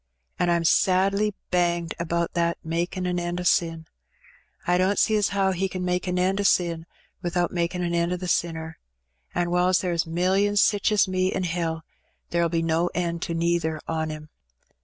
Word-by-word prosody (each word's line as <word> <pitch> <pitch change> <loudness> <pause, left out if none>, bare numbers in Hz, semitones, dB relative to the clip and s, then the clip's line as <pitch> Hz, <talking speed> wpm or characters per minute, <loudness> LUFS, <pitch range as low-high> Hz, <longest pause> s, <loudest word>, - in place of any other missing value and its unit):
An' 180 - +2
Pm 170 -1 +2
sadly 195 +4 +2 0.2
banged 175 -2 +1
about 170 0 -1
that 170 -1 0
'makin^ 175 +3 -2
an 180 0 0
end 175 0 -3
o' - - -3
sin'; 165 -3 +1 0.8
I 180 +1 +2
don't 190 +2 +2
see 220 - +3
as 210 -1 +2
how 195 -1 +1
He 190 +1 -1
can 185 -1 -4
make 180 +1 -1
an 180 0 -1
end 190 +2 +1
o* - - -1
sin 170 -4 +1 0.3
without 175 -1 0
makin' 175 +1 -1
an 170 0 -1
end 170 0 +1
o* 180 - -1
the 180 0 -5
sinner; 160 -2 -2 0.6
an' 175 0 0
whiles 180 0 +3
there 180 -2 -1
is 165 -1 0
millions 190 +5 +2
sich 205 +1 +3
as 210 -2 +3
me 185 0 0
in 190 - -2
hell, 165 -2 -2 0.5
there'll 170 -1 +2
be 165 0 0
no 165 +1 +1
end 170 -1 -1
to 170 - -3
neither 165 -2 0
on 160 -1 -2
'em. 155 0 -8
175 Hz, 195 wpm, -25 LUFS, 170-185 Hz, 0.8 s, see